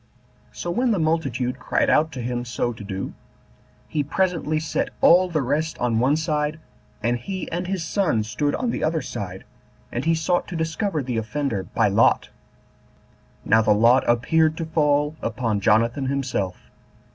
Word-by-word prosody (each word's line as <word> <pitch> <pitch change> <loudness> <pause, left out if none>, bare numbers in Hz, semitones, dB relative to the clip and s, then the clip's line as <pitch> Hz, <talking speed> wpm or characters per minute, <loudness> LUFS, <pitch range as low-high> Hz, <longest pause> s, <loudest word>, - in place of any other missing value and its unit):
So 175 - -4
when 245 +7 +1
the 215 - +2
multitude 140 -7 -1
cried - - 0
out 160 +1 +3
to 125 - -5
him 120 0 -2
so 120 0 -2
to 110 - -10
do, 95 -1 -5 0.7
he 150 - -1
presently 165 -1 0
set 155 - -2
all 180 +2 +6
the 155 -4 0
rest 150 +5 -1
on 120 -2 0
one 135 +5 +3
side, 155 -1 -1 0.4
and 120 +2 +1
he 185 +8 -5
and 175 +2 -3
his 190 -3 -2
son 160 - +1
stood 145 +7 -1
on 245 -2 -1
the - - -3
other 155 -1 0
side, 95 -6 -6 0.5
and 120 - -3
he 165 +1 +2
sought 170 +2 0
to 180 - -6
discover 160 0 -1
the 125 -2 -3
offender 110 -3 -2
by - - +4
lot. - - +3 1.2
Now 110 +1 +5
the 105 -1 +3
lot 120 +5 +5
appeared 155 +7 +2
to 165 - -3
fall 150 -1 +1
upon 115 -3 -1
Jonathan 115 +6 +2
himself. 130 -9 -3
145 Hz, 170 wpm, -23 LUFS, 120-160 Hz, 1.2 s, all